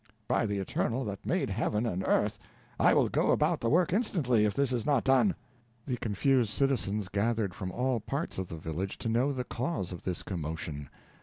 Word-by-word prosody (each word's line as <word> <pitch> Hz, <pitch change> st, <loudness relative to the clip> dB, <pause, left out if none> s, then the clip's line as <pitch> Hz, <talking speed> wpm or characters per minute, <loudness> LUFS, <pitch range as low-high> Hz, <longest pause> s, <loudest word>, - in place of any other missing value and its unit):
"By 115 Hz, -, +2 dB
the 100 Hz, -1 st, -1 dB
Eternal 115 Hz, +6 st, -1 dB
that 100 Hz, -1 st, -6 dB
made 175 Hz, -, 0 dB
Heaven 110 Hz, +2 st, 0 dB
and 95 Hz, -5 st, -1 dB
earth! -, -, +2 dB, 0.4 s
I -, -, +6 dB
will -, -, +4 dB
go -, -, +1 dB
about -, -, +2 dB
the 115 Hz, -, +1 dB
work 170 Hz, +4 st, +3 dB
instantly, 145 Hz, -, +2 dB
if 105 Hz, -1 st, 0 dB
this 140 Hz, -2 st, +1 dB
is 120 Hz, -3 st, 0 dB
not 140 Hz, -5 st, +2 dB
done!" 135 Hz, +9 st, +4 dB, 0.5 s
The 125 Hz, -3 st, -2 dB
confused 120 Hz, +2 st, +2 dB
citizens 110 Hz, -6 st, 0 dB
gathered 105 Hz, 0 st, 0 dB
from 95 Hz, 0 st, -5 dB
all 125 Hz, +1 st, 0 dB
parts 140 Hz, -, -3 dB
of 95 Hz, -, -3 dB
the 80 Hz, -, -7 dB
village, 80 Hz, +5 st, -4 dB
to 115 Hz, -, -3 dB
know 120 Hz, +5 st, +2 dB
the 130 Hz, -2 st, -2 dB
cause 125 Hz, -, -3 dB
of 90 Hz, -, -7 dB
this 90 Hz, -2 st, -3 dB
commotion. 80 Hz, -5 st, -5 dB
115 Hz, 200 wpm, -30 LUFS, 95-135 Hz, 0.5 s, I